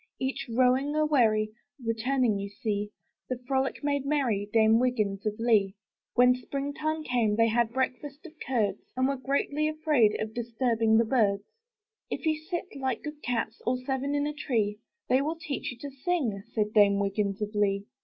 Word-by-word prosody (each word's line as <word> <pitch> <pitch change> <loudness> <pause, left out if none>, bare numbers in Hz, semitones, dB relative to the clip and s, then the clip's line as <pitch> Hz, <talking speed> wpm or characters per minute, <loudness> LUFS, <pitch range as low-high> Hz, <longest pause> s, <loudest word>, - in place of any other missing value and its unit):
Each 265 +1 -2
rowing 255 +4 +2
a 310 0 +3
wherry, 220 -7 +3 0.3
Returning 230 -1 +1
you 200 0 -4
see: 205 0 -3 0.4
The 255 - -1
frolic 270 +1 0
made 285 -1 0
merry 250 -9 0
Dame 220 0 +5
Wiggins 215 -5 0
of 210 0 -2
Lee. 215 -4 +3 0.4
When 250 0 +6
spring 275 +3 -4
time 310 +1 -2
came 240 -6 +1
back, - - -7
They 230 0 +4
had 230 0 +1
breakfast 270 +4 -3
of 325 - -10
curds; 215 -7 0 0.2
And 260 0 +3
were 275 - 0
greatly 280 +3 0
afraid 305 -8 +2
Of 215 0 -3
disturbing 230 -1 +1
the 230 - +4
birds. 210 -4 +2 0.7
''If - - -4
you 315 -1 +3
sit, 345 +4 -6
like 265 -3 -2
good 300 -1 -7
cats, 230 -2 -2
All 250 +1 +1
seven 270 +2 -2
in 290 0 +1
a 300 - -2
tree, 220 -8 -1 0.3
They 260 +2 +3
will 310 +4 -1
teach 290 -4 -4
you 245 - -10
to - - -8
sing!' 265 - -1
Said 210 -1 -1
Dame 205 -2 +5
Wiggins 200 0 -1
of 210 0 -3
Lee. 200 -1 +1
245 Hz, 185 wpm, -28 LUFS, 215-280 Hz, 0.7 s, When